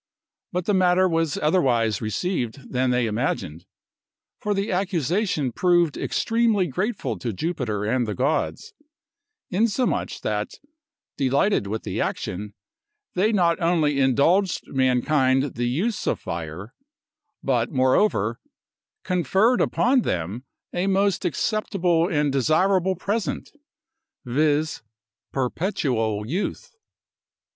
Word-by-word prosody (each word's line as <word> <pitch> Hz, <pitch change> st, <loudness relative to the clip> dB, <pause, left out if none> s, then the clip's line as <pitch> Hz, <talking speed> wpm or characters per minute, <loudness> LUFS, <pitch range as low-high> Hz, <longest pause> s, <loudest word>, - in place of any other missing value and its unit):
But 180 Hz, -1 st, -2 dB
the 205 Hz, -, +1 dB
matter 185 Hz, 0 st, +4 dB
was 165 Hz, -3 st, 0 dB
otherwise 125 Hz, -, +2 dB
received 125 Hz, -, -3 dB
than 130 Hz, 0 st, +1 dB
they 125 Hz, -1 st, +2 dB
imagined; 95 Hz, -7 st, -2 dB, 0.7 s
for 210 Hz, -1 st, -1 dB
the 195 Hz, +1 st, -1 dB
accusation 180 Hz, -, 0 dB
proved 175 Hz, +2 st, +2 dB
extremely 225 Hz, -4 st, +1 dB
grateful 190 Hz, -, -2 dB
to 120 Hz, -, -3 dB
Jupiter 110 Hz, -, -2 dB
and 120 Hz, +2 st, 0 dB
the 105 Hz, -, -3 dB
gods, 155 Hz, -, -1 dB, 0.8 s
insomuch 230 Hz, +6 st, 0 dB
that, -, -, -2 dB, 0.6 s
delighted 140 Hz, -, +2 dB
with 110 Hz, +2 st, -3 dB
the -, -, -3 dB
action, 100 Hz, +3 st, -4 dB, 0.6 s
they 200 Hz, +5 st, +2 dB
not 175 Hz, -5 st, +2 dB
only 160 Hz, -4 st, +2 dB
indulged 160 Hz, +9 st, +3 dB
mankind 130 Hz, +1 st, +2 dB
the 120 Hz, +1 st, -1 dB
use 190 Hz, -, -1 dB
of -, -, 0 dB
fire, 85 Hz, +6 st, -6 dB, 0.7 s
but 120 Hz, -3 st, +1 dB
moreover 130 Hz, -, +2 dB, 0.6 s
conferred 190 Hz, -, +2 dB
upon 255 Hz, +1 st, +3 dB
them 95 Hz, -, -3 dB, 0.3 s
a 180 Hz, +2 st, 0 dB
most 195 Hz, -1 st, +1 dB
acceptable 180 Hz, -6 st, +1 dB
and 150 Hz, -4 st, +1 dB
desirable 185 Hz, +7 st, +2 dB
present, 200 Hz, -3 st, -3 dB, 0.7 s
viz: 150 Hz, +4 st, +1 dB, 0.5 s
perpetual 125 Hz, -, -1 dB
youth. 175 Hz, -, -3 dB
155 Hz, 105 wpm, -24 LUFS, 125-190 Hz, 0.8 s, matter